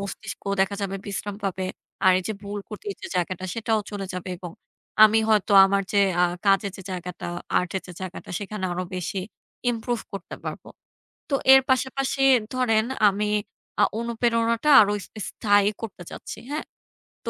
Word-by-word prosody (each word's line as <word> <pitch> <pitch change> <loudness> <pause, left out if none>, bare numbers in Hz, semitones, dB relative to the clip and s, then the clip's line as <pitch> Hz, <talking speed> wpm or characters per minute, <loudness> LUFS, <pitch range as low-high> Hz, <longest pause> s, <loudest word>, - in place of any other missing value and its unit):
মস্তিষ্ক 200 +2 -7 0.2
দেখা 195 +1 +2
যাবে 195 0 -2
বিশ্রাম 200 0 -4
পাবে 190 -1 -2 0.4
আর 185 - +7
এই - - -4
যে 220 - 0
ভুল 205 0 -5
করতে 210 -1 -9
যে - - -6
জায়গাটা 180 +1 -2
সেটাও 225 -1 0
চলে 200 -2 -4
যাবে। 180 0 -5
এবং 175 -1 -8 0.5
আমি 215 +1 +5
হয়তো 215 -1 +3
আমার 195 +1 +2
যে 205 - +4 0.2
আ - - +6 0.2
কাজের 195 0 +3
যে 190 - -9
জায়গাটা, 180 -1 -6 0.3
আর্টের 180 +1 -2
যে 180 - -9
জায়গাটা 185 -1 -7
সেখানে 205 -1 -5
আরো 180 +1 -2
বেশি 185 +2 -3 0.5
ইমপ্রুভ 235 0 -2
করতে 195 -3 -7
পারবো। - - -6 0.6
তো 280 - +1 0.2
এর 265 - +9
পাশাপাশি 265 +1 0 0.3
ধরেন 225 -4 +2 0.2
আমি 210 +2 0 0.5
আ - - +8 0.2
অনুপ্রেরণাটা 235 +3 +1
আরো 205 -1 +4
স - - -13 0.2
স্থায়ী 205 -1 +3
করতে 205 -5 -6
চাচ্ছি, - - -8
হ্যাঁ? 305 +2 -3 0.6
তো - - -1
205 Hz, 165 wpm, -25 LUFS, 190-225 Hz, 0.6 s, এর